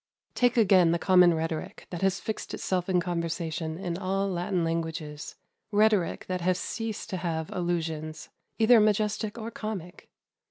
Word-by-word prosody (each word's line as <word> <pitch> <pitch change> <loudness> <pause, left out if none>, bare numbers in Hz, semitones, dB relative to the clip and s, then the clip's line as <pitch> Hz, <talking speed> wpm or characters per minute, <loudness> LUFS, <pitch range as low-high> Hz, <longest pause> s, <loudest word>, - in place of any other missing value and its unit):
Take 245 0 +2
again 185 -6 +5
the - - +2
common 180 -1 +5
rhetoric 165 +4 -4
that 175 - -5
has 195 0 +2
fixed 220 - -4
itself 185 -1 -2
in 180 -1 +3
conversation 165 -2 -3
in 175 -2 -4
all 195 +1 0
Latin 180 -1 -1
languages 160 -2 -3 0.4
rhetoric 210 -3 +2
that 185 -1 -3
has 180 +1 +2
ceased 225 +3 -4
to 185 - -1
have 165 -3 -3
allusions, 160 -3 -3 0.3
either 230 +1 +6
majestic 210 +1 +1
or 230 0 -5
comic. 200 -6 -6
180 Hz, 150 wpm, -28 LUFS, 165-205 Hz, 0.4 s, either